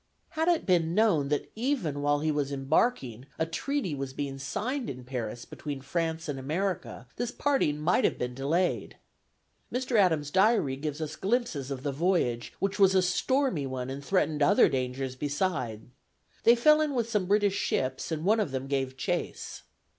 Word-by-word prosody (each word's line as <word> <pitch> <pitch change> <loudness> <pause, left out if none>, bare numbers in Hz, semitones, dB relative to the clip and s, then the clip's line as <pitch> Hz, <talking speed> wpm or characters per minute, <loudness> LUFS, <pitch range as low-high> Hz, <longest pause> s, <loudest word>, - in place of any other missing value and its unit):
Had 320 +1 -1
it 345 -2 +2
been 170 -2 +2
known 200 -10 +3
that 145 0 -2
even 220 - -1
while 145 0 +2
he 155 0 +1
was 145 -2 -1
embarking 135 - 0
a 160 - +1
treaty 190 - -2
was 135 -2 -4
being 135 -1 -4
signed 235 - -3
in 125 -2 -7
Paris 120 -2 -5
between 145 -3 -6
France 165 +3 -2
and 140 -3 -3
America, 150 - -3
this 240 0 -1
parting 270 - +1
might 150 - +2
have - - +2
been 125 0 -3
delayed. 155 +8 -1 0.7
Mr. 250 0 -2
Adams' 160 -7 +3
diary 190 - +3
gives 150 +2 -4
us 155 -1 -4
glimpses 190 - -1
of 135 -2 -5
the 145 - -1
voyage, 140 -7 0
which 195 +1 -2
was 190 -1 +5
a 185 - +5
stormy 185 - +1
one 130 0 -4
and 140 +1 -6
threatened 155 -3 +1
other 195 +8 +6
dangers 130 -1 -2
beside. 140 - -2 0.6
They 235 - +8
fell 305 +6 +5
in 300 -3 0
with 235 -2 0
some 210 -5 0
British 205 0 +3
ships, 130 -7 -1
and 160 +1 -2
one 220 +3 +4
of 210 - 0
them 130 0 -3
gave 135 -1 -2
chase. - - -3
155 Hz, 175 wpm, -28 LUFS, 135-200 Hz, 0.7 s, They